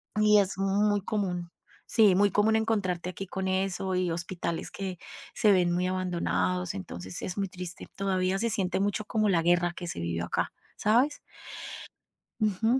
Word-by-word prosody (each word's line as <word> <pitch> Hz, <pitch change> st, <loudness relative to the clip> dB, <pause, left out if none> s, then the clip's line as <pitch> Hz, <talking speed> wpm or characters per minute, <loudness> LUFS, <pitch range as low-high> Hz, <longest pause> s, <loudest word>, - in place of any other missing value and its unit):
Y 210 Hz, 0 st, +6 dB
es 195 Hz, -1 st, 0 dB
muy 205 Hz, +1 st, +2 dB
común, 180 Hz, -4 st, -2 dB, 0.3 s
sí, 210 Hz, -5 st, +5 dB
muy 205 Hz, 0 st, +4 dB
común 215 Hz, +2 st, +3 dB
encontrarte 200 Hz, -6 st, 0 dB
aquí 195 Hz, +1 st, -7 dB
con 190 Hz, 0 st, -3 dB
eso 190 Hz, 0 st, 0 dB
y 180 Hz, -1 st, +1 dB
hospitales 170 Hz, 0 st, -3 dB
que 190 Hz, -2 st, -5 dB, 0.4 s
se 215 Hz, -3 st, +4 dB
ven 180 Hz, -3 st, +4 dB
muy 180 Hz, +1 st, +1 dB
abandonados. 90 Hz, -, 0 dB
Entonces 90 Hz, -1 st, -6 dB
es 185 Hz, -, -4 dB
muy 195 Hz, -2 st, -1 dB
triste. 180 Hz, -1 st, -6 dB
Todavía 190 Hz, -1 st, 0 dB
se 230 Hz, +1 st, +1 dB
siente 190 Hz, -3 st, 0 dB
mucho 205 Hz, +1 st, 0 dB
como 215 Hz, -1 st, +1 dB
la 170 Hz, -4 st, +3 dB
guerra 175 Hz, 0 st, +3 dB
que 175 Hz, -, -6 dB
se 165 Hz, -, -4 dB
vivió 85 Hz, 0 st, -2 dB
acá, -, -, -1 dB, 0.2 s
¿sabes? 250 Hz, +8 st, +2 dB, 1.2 s
Ujú. 220 Hz, +4 st, +2 dB
185 Hz, 165 wpm, -28 LUFS, 175-205 Hz, 1.2 s, Y